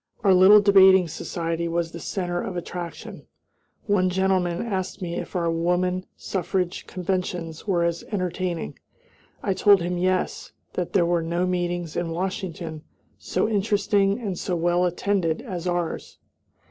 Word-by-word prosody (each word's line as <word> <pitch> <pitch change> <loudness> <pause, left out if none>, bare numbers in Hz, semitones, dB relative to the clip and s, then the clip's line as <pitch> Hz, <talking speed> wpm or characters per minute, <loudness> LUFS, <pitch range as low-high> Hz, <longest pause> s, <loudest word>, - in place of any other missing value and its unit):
Our 195 -3 +5
little 190 +3 +8
debating 190 -2 +6
society 165 +1 -3
was 170 0 -1
the 170 - -8
center 175 -1 -2
of 180 - -4
attraction. 175 0 -7 0.6
One 195 -3 +2
gentleman 185 0 0
asked 190 -4 -3
me 175 -3 -4
if 175 - -5
our 170 -2 +1
woman 180 +2 0
suffrage 180 -1 -2
conventions 180 -2 -3
were 175 -4 +2
as 170 0 -1
entertaining. 180 -3 -3 0.6
I 195 - +1
told 200 +1 +5
him 175 0 -2
yes; 185 +1 -1 0.2
that 180 -2 -3
there 180 -4 +4
were 170 0 +1
no 170 +2 -1
meetings 175 -2 -2
in 175 -1 -1
Washington 170 -2 -4 0.4
so - - -1
interesting 205 -1 +1
and 200 -7 -4
so 180 - -2
well 175 +1 +2
attended 175 -2 -1
as 185 -7 -5
ours. 175 -2 -3
180 Hz, 145 wpm, -24 LUFS, 170-190 Hz, 0.6 s, little